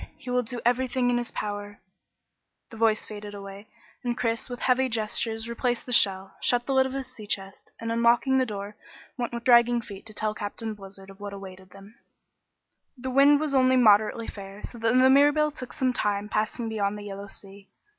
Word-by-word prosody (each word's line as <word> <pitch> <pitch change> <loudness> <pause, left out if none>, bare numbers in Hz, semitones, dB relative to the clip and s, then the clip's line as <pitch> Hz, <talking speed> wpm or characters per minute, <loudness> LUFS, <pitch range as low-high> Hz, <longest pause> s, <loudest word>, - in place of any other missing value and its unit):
He 250 - -7
will 250 0 +2
do 245 +1 -6
everything 250 0 +1
in 240 - +1
his 240 - -5
power 205 -1 -5 0.5
" - - -55
The - - -10
voice 220 -1 +2
faded 210 -1 -8
away, 200 +1 -10 0.4
and 240 -1 -2
Chris 230 +1 -1
with 245 0 -7
heavy 260 +1 +2
gestures 225 0 -1
replaced 240 +1 -2
the 250 - -2
shell, 190 -3 +3
shut 240 -1 +2
the 275 - -1
lid 265 0 +4
of 265 - -7
his 270 -1 -3
sea 215 -4 -11
chest, 195 -1 -4
and 230 0 -4
unlocking 235 +3 +3
the 260 - +2
door, 205 -1 -6 0.4
went 245 -2 -3
with 235 0 -5
dragging 240 -1 +5
feet 205 -2 -10
to 215 - -6
tell 215 0 0
Captain 220 +1 -5
Blizzard 195 -1 -12
of 195 - -17
what 205 0 -7
awaited 190 -1 -10
them. 200 +2 -15 1.0
The 260 +1 -5
wind 280 +2 +6
was 305 -2 -2
only 260 -1 +4
moderately 220 -1 +4
fair 195 -1 -9
so 235 - -8
that 225 +1 +1
the 260 +1 +6
Mirabelle 290 +2 +4
took 255 -3 -8
some 255 -1 0
time 205 -2 -1
passing 220 +2 -1
beyond 210 -2 -1
the 205 - -8
Yellow 200 0 -7
Sea. 195 0 -14
225 Hz, 205 wpm, -26 LUFS, 205-250 Hz, 1.0 s, wind